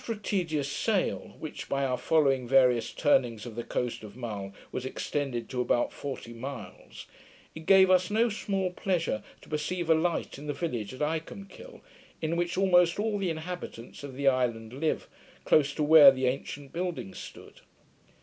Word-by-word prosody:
After 230 Hz, -, -3 dB
a -, -, -9 dB
tedious 170 Hz, -9 st, -1 dB
sail, 210 Hz, +1 st, -1 dB
which, 155 Hz, -, -7 dB
by 140 Hz, 0 st, 0 dB
our 130 Hz, -1 st, 0 dB
following 135 Hz, -3 st, +2 dB
various 125 Hz, -3 st, +4 dB
turnings 120 Hz, -7 st, +1 dB
of 120 Hz, -, -7 dB
the 120 Hz, +2 st, -5 dB
coast 120 Hz, -1 st, -3 dB
of 105 Hz, -1 st, -10 dB
Mull, 105 Hz, -6 st, -5 dB, 0.2 s
was 125 Hz, -, -4 dB
extended 130 Hz, -2 st, -3 dB
to 125 Hz, -1 st, -2 dB
about 120 Hz, -1 st, +1 dB
forty 135 Hz, -4 st, -6 dB
miles, 130 Hz, +4 st, -8 dB, 0.5 s
it 160 Hz, 0 st, -10 dB
gave 190 Hz, -1 st, +7 dB
us 185 Hz, 0 st, +4 dB
no 225 Hz, +3 st, +3 dB
small 195 Hz, -4 st, -2 dB
pleasure 175 Hz, -, -1 dB, 0.2 s
to -, -, -16 dB
perceive 165 Hz, +3 st, -1 dB
a -, -, +9 dB
light 160 Hz, -3 st, -1 dB
in 150 Hz, -, -9 dB
the 145 Hz, -, -1 dB
village 120 Hz, -, -3 dB
of 130 Hz, -, -3 dB
Icolmkill, 195 Hz, -, -5 dB, 0.4 s
in 160 Hz, +1 st, -1 dB
which 175 Hz, +1 st, -1 dB
almost 180 Hz, -2 st, +4 dB
all 210 Hz, -1 st, 0 dB
the 190 Hz, -2 st, 0 dB
inhabitants 160 Hz, -7 st, -6 dB
of 140 Hz, -2 st, -7 dB
the 140 Hz, +1 st, -1 dB
island 120 Hz, -4 st, +1 dB
live, 155 Hz, +4 st, -1 dB, 0.4 s
close 145 Hz, -2 st, +4 dB
to 155 Hz, -, 0 dB
where 150 Hz, -1 st, +9 dB
the 130 Hz, -1 st, 0 dB
ancient 135 Hz, +2 st, -3 dB
building 170 Hz, -, -3 dB
stood. -, -, -11 dB
150 Hz, 175 wpm, -29 LUFS, 125-175 Hz, 0.5 s, a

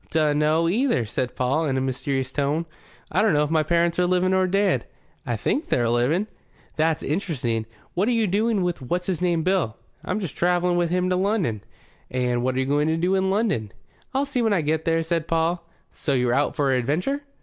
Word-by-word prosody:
"Dunno, 155 Hz, +1 st, +2 dB
either," 220 Hz, -, +1 dB
said 125 Hz, +4 st, -3 dB
Paul, 135 Hz, +6 st, +1 dB
in 135 Hz, -2 st, 0 dB
a -, -, +2 dB
mysterious 130 Hz, 0 st, -2 dB
tone. 145 Hz, +4 st, 0 dB, 0.5 s
"I 190 Hz, -, +2 dB
dunno 175 Hz, -9 st, +3 dB
if 150 Hz, -, -2 dB
my 160 Hz, -1 st, +3 dB
parents 170 Hz, +2 st, +1 dB
are 180 Hz, -, +3 dB
living 185 Hz, +1 st, +2 dB
or 190 Hz, 0 st, +3 dB
dead. 195 Hz, +1 st, +1 dB, 0.4 s
I -, -, 0 dB
think 295 Hz, -, -1 dB
they're 120 Hz, -2 st, +2 dB
living." 125 Hz, -, +2 dB, 0.5 s
"That's 160 Hz, 0 st, +1 dB
interesting. 125 Hz, -, -2 dB, 0.3 s
What 190 Hz, +4 st, +1 dB
are -, -, +2 dB
you 230 Hz, -2 st, +2 dB
doing 210 Hz, +1 st, +1 dB
with 175 Hz, -4 st, -2 dB
what's 175 Hz, +8 st, -2 dB
his 180 Hz, -3 st, -2 dB
name 170 Hz, -3 st, +1 dB
Bill?" 180 Hz, -, 0 dB, 0.3 s
"I'm -, -, -2 dB
just 180 Hz, -9 st, -5 dB
travelling 175 Hz, 0 st, +2 dB
wi' 175 Hz, -1 st, +2 dB
him 180 Hz, +2 st, 0 dB
to -, -, +3 dB
London." 185 Hz, -, 0 dB, 0.5 s
"And 125 Hz, -1 st, 0 dB
what 130 Hz, +1 st, 0 dB
are -, -, 0 dB
you 130 Hz, -, +1 dB
going 145 Hz, +2 st, +1 dB
to 160 Hz, 0 st, +1 dB
do 180 Hz, +3 st, +1 dB
in 190 Hz, 0 st, +2 dB
London?" 190 Hz, -, 0 dB, 0.4 s
"I'll 270 Hz, +1 st, 0 dB
see 270 Hz, -3 st, -1 dB
when 220 Hz, -2 st, +2 dB
I 185 Hz, -, +2 dB
get 155 Hz, +1 st, -1 dB
there," 165 Hz, 0 st, +2 dB
said 165 Hz, -1 st, -1 dB
Paul. 165 Hz, +1 st, 0 dB, 0.2 s
"So 145 Hz, -, -2 dB
you're 125 Hz, -1 st, +2 dB
out 145 Hz, +3 st, +1 dB
for 140 Hz, -2 st, +1 dB
adventure?" 150 Hz, -, 0 dB
165 Hz, 210 wpm, -24 LUFS, 140-185 Hz, 0.5 s, dunno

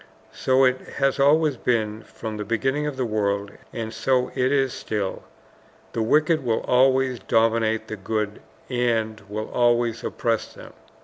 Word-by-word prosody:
So 130 Hz, +1 st, +2 dB
it 130 Hz, 0 st, +3 dB, 0.2 s
has 135 Hz, 0 st, +1 dB
always 145 Hz, 0 st, +4 dB
been 110 Hz, -3 st, 0 dB
from 110 Hz, -1 st, -7 dB
the 105 Hz, -, -3 dB
beginning 135 Hz, +7 st, 0 dB
of 145 Hz, -3 st, -4 dB
the 130 Hz, -, 0 dB
world, 100 Hz, -2 st, -1 dB, 0.2 s
and 110 Hz, -1 st, -5 dB
so 130 Hz, 0 st, +1 dB
it 130 Hz, +1 st, +1 dB
is 135 Hz, -3 st, +2 dB
still. 105 Hz, -3 st, -3 dB, 0.7 s
THE 115 Hz, -, -1 dB
WICKED 155 Hz, +7 st, +3 dB
WILL 115 Hz, -4 st, 0 dB
ALWAYS 130 Hz, 0 st, +3 dB
DOMINATE 110 Hz, -1 st, +2 dB
THE 110 Hz, -, -5 dB
GOOD, 105 Hz, +1 st, -3 dB, 0.3 s
AND 115 Hz, -3 st, 0 dB
WILL 110 Hz, +1 st, -5 dB
ALWAYS 120 Hz, -1 st, +2 dB
OPPRESS 115 Hz, -1 st, -2 dB
THEM. -, -, -12 dB
115 Hz, 150 wpm, -24 LUFS, 110-130 Hz, 0.7 s, always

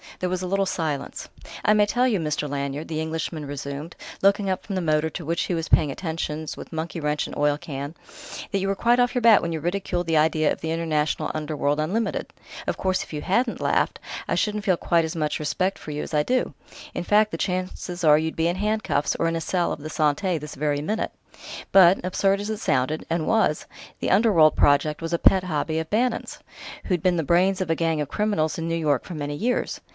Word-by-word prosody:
There 180 Hz, -, -2 dB
was 185 Hz, 0 st, -2 dB
a -, -, -2 dB
little 195 Hz, +1 st, +1 dB
silence.... 155 Hz, -6 st, -3 dB, 0.4 s
"I 210 Hz, -, +5 dB
may 210 Hz, -1 st, +4 dB
tell 245 Hz, +5 st, +2 dB
you, 215 Hz, -6 st, +1 dB
Mr. 150 Hz, -2 st, -2 dB
Lanyard," 140 Hz, +2 st, -3 dB
the 155 Hz, -1 st, -3 dB
Englishman 160 Hz, -1 st, -3 dB
resumed, 140 Hz, +3 st, -6 dB, 0.3 s
looking 200 Hz, 0 st, +3 dB
up 185 Hz, -, -2 dB
from 200 Hz, -, -5 dB
the 185 Hz, -, 0 dB
motor, 155 Hz, -1 st, +1 dB
to 170 Hz, +1 st, -6 dB
which 165 Hz, +2 st, 0 dB
he -, -, -2 dB
was 165 Hz, -1 st, -2 dB
paying 150 Hz, -, +4 dB
attentions 160 Hz, -1 st, -4 dB
with -, -, -9 dB
monkey 160 Hz, +2 st, -4 dB
wrench 150 Hz, -1 st, -1 dB
and -, -, -8 dB
oil 145 Hz, 0 st, +2 dB
can, 145 Hz, -1 st, -6 dB, 0.6 s
"that 200 Hz, -, +1 dB
you 195 Hz, -, -1 dB
were 195 Hz, -, 0 dB
quite 240 Hz, +4 st, +3 dB
off 245 Hz, 0 st, +2 dB
your 245 Hz, -, +1 dB
bat 230 Hz, -3 st, +7 dB
when 170 Hz, -, -2 dB
you 160 Hz, -, -2 dB
ridiculed 175 Hz, +1 st, -2 dB
the 165 Hz, -1 st, +2 dB
idea 155 Hz, 0 st, +3 dB
of -, -, -4 dB
the 160 Hz, -, -2 dB
'International 160 Hz, -2 st, 0 dB
Underworld 150 Hz, -1 st, -1 dB
Unlimited.' 200 Hz, +7 st, -1 dB, 0.3 s
Of -, -, -1 dB
course, 185 Hz, -1 st, 0 dB
if -, -, -13 dB
you 150 Hz, -, -3 dB
hadn't 235 Hz, +6 st, 0 dB
laughed, -, -, +1 dB, 0.3 s
I -, -, 0 dB
shouldn't 210 Hz, -1 st, 0 dB
feel 185 Hz, -5 st, +2 dB
quite 170 Hz, -1 st, +2 dB
as 160 Hz, -, -5 dB
much 155 Hz, -2 st, -1 dB
respect 185 Hz, +5 st, -1 dB
for 155 Hz, -, -8 dB
you 150 Hz, 0 st, -3 dB
as -, -, -8 dB
I 150 Hz, -, +3 dB
do; 255 Hz, +6 st, 0 dB, 0.4 s
in -, -, -2 dB
fact, 210 Hz, +3 st, +3 dB
the -, -, -3 dB
chances 180 Hz, -1 st, -3 dB
are 150 Hz, -2 st, +7 dB
you'd 160 Hz, +1 st, -2 dB
be 165 Hz, +1 st, +1 dB
in 175 Hz, +2 st, -1 dB
handcuffs 210 Hz, -7 st, 0 dB
or -, -, 0 dB
in 165 Hz, -, 0 dB
a 165 Hz, -, -2 dB
cell 175 Hz, +1 st, 0 dB
of -, -, -5 dB
the 155 Hz, -, -6 dB
Santé, 155 Hz, +3 st, +1 dB
this 150 Hz, 0 st, -8 dB
very 145 Hz, 0 st, 0 dB
minute.... 215 Hz, +9 st, -2 dB, 0.6 s
But, 185 Hz, -1 st, +6 dB
absurd 195 Hz, +2 st, +1 dB
as 205 Hz, -, -4 dB
it 220 Hz, -, -2 dB
sounded 150 Hz, -, 0 dB
and 165 Hz, -1 st, -1 dB
was 220 Hz, -9 st, +2 dB, 0.3 s
the -, -, -1 dB
'Underworld' 190 Hz, -7 st, +5 dB
project 145 Hz, +2 st, +3 dB
was 165 Hz, +1 st, -3 dB
a 170 Hz, -, +1 dB
pet 190 Hz, -1 st, +5 dB
hobby 160 Hz, -2 st, -1 dB
of 160 Hz, 0 st, -5 dB
Bannon's 230 Hz, +2 st, -1 dB, 0.5 s
who'd 180 Hz, -4 st, 0 dB
been 180 Hz, -1 st, +3 dB
the 165 Hz, -, 0 dB
brains 185 Hz, +5 st, +2 dB
of 185 Hz, -, -2 dB
a -, -, +2 dB
gang 165 Hz, -2 st, 0 dB
of 145 Hz, -, -3 dB
criminals 205 Hz, -7 st, 0 dB
in 165 Hz, 0 st, -3 dB
New 165 Hz, -, 0 dB
York 150 Hz, -5 st, +1 dB
for 180 Hz, -, -7 dB
many 145 Hz, -1 st, -3 dB
years. 240 Hz, +11 st, -1 dB
165 Hz, 230 wpm, -24 LUFS, 150-195 Hz, 0.6 s, bat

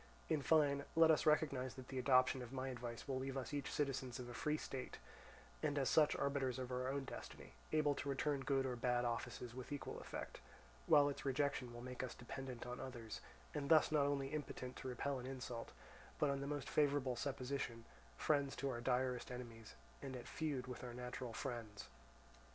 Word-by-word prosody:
In 155 Hz, -, +2 dB
fine, 140 Hz, -2 st, +4 dB
let 165 Hz, 0 st, +8 dB
us 155 Hz, -, +3 dB
recognize 140 Hz, -5 st, +3 dB
that 130 Hz, -1 st, -9 dB
the 130 Hz, -, -2 dB
adoption 130 Hz, 0 st, +5 dB
of 125 Hz, -1 st, -7 dB
my 135 Hz, 0 st, -2 dB
advice 120 Hz, -1 st, -5 dB
will 130 Hz, -1 st, 0 dB
leave 135 Hz, +1 st, -2 dB
us 135 Hz, +2 st, -3 dB
each 145 Hz, -2 st, -2 dB
citizens 135 Hz, -4 st, -1 dB
of 125 Hz, -, -6 dB
a 120 Hz, -, -6 dB
free 150 Hz, +5 st, +1 dB
state, 130 Hz, -4 st, -5 dB, 0.6 s
and 145 Hz, -1 st, +1 dB
as 135 Hz, -2 st, +3 dB
such 150 Hz, -2 st, +6 dB
arbiters 135 Hz, -3 st, +1 dB
of 130 Hz, -1 st, -4 dB
our 125 Hz, 0 st, 0 dB
own 140 Hz, 0 st, -1 dB
destiny, -, -, -8 dB, 0.2 s
able 150 Hz, -2 st, +4 dB
to 140 Hz, -, -3 dB
return 140 Hz, +1 st, +1 dB
good 135 Hz, 0 st, +2 dB
or 125 Hz, -1 st, -1 dB
bad 120 Hz, 0 st, +2 dB
offices 120 Hz, 0 st, -2 dB
with 130 Hz, +3 st, -7 dB
equal 145 Hz, -, -4 dB
effect; -, -, -6 dB, 0.5 s
while 145 Hz, -1 st, +8 dB
its 145 Hz, -, -3 dB
rejection 140 Hz, -2 st, +1 dB
will 120 Hz, 0 st, -7 dB
make 125 Hz, 0 st, -4 dB
us 130 Hz, -2 st, -4 dB
dependent 125 Hz, 0 st, -6 dB
on 125 Hz, 0 st, -4 dB
others, 120 Hz, -4 st, -6 dB, 0.3 s
and 145 Hz, -2 st, -2 dB
thus 155 Hz, -2 st, +7 dB
not 145 Hz, -2 st, +4 dB
only 140 Hz, -1 st, 0 dB
impotent 140 Hz, -4 st, -4 dB
to -, -, -5 dB
repel 130 Hz, +2 st, -1 dB
an 125 Hz, -, -6 dB
insult, 125 Hz, -3 st, -5 dB, 0.5 s
but 145 Hz, -2 st, +3 dB
on 140 Hz, 0 st, -1 dB
the 140 Hz, -, -2 dB
most 145 Hz, -1 st, -2 dB
favourable 140 Hz, -4 st, +3 dB
supposition, 125 Hz, -2 st, -2 dB, 0.3 s
friends 140 Hz, -2 st, +2 dB
to 140 Hz, -1 st, -1 dB
our 120 Hz, -1 st, -3 dB
direst 125 Hz, 0 st, +1 dB
enemies, 115 Hz, -3 st, -7 dB, 0.3 s
and 135 Hz, -1 st, -4 dB
at 125 Hz, -, -7 dB
feud 145 Hz, -5 st, -1 dB
with 125 Hz, -1 st, -6 dB
our 120 Hz, -1 st, -5 dB
natural 125 Hz, 0 st, -4 dB
friends. 115 Hz, -, -4 dB
130 Hz, 195 wpm, -41 LUFS, 125-140 Hz, 0.6 s, let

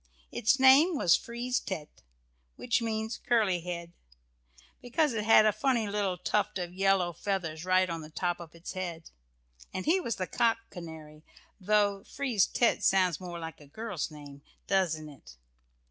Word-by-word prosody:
Its 240 Hz, +5 st, +2 dB
name 275 Hz, +7 st, +6 dB
was 170 Hz, -10 st, +5 dB
"Frise 240 Hz, +2 st, -2 dB
tête," 160 Hz, -7 st, -7 dB, 0.5 s
which 240 Hz, 0 st, 0 dB
means 220 Hz, 0 st, -3 dB
"curly 215 Hz, -7 st, +3 dB
head," 170 Hz, -1 st, -6 dB, 0.9 s
because 280 Hz, +3 st, +1 dB
it 215 Hz, -2 st, -2 dB
had 220 Hz, -1 st, +7 dB
a 215 Hz, -, +5 dB
funny 240 Hz, -1 st, 0 dB
little 200 Hz, -3 st, -1 dB
tuft 205 Hz, +3 st, -1 dB
of 175 Hz, -1 st, -5 dB
yellow 190 Hz, -2 st, +2 dB
feathers 170 Hz, -3 st, -3 dB
right 185 Hz, 0 st, +3 dB
on 165 Hz, -2 st, -4 dB
the 155 Hz, -, -10 dB
top 175 Hz, +2 st, -2 dB
of 170 Hz, -1 st, -11 dB
its 170 Hz, +1 st, -8 dB
head, 175 Hz, -3 st, -6 dB, 0.6 s
and 185 Hz, -, -4 dB
he 355 Hz, +4 st, +3 dB
was 235 Hz, -9 st, -2 dB
the 185 Hz, -, -3 dB
cock 225 Hz, +6 st, +1 dB
canary, 160 Hz, -3 st, -10 dB, 0.4 s
though 205 Hz, 0 st, +1 dB
Frise 250 Hz, -8 st, 0 dB
tête 235 Hz, -, +1 dB
sounds 185 Hz, -4 st, +3 dB
more 175 Hz, -2 st, -7 dB
like 165 Hz, -2 st, -8 dB
a 145 Hz, -, -15 dB
girl's 200 Hz, 0 st, -4 dB
name, 145 Hz, -2 st, -12 dB, 0.2 s
doesn't 170 Hz, -6 st, 0 dB
it? 135 Hz, -, -14 dB
190 Hz, 160 wpm, -29 LUFS, 170-220 Hz, 0.9 s, had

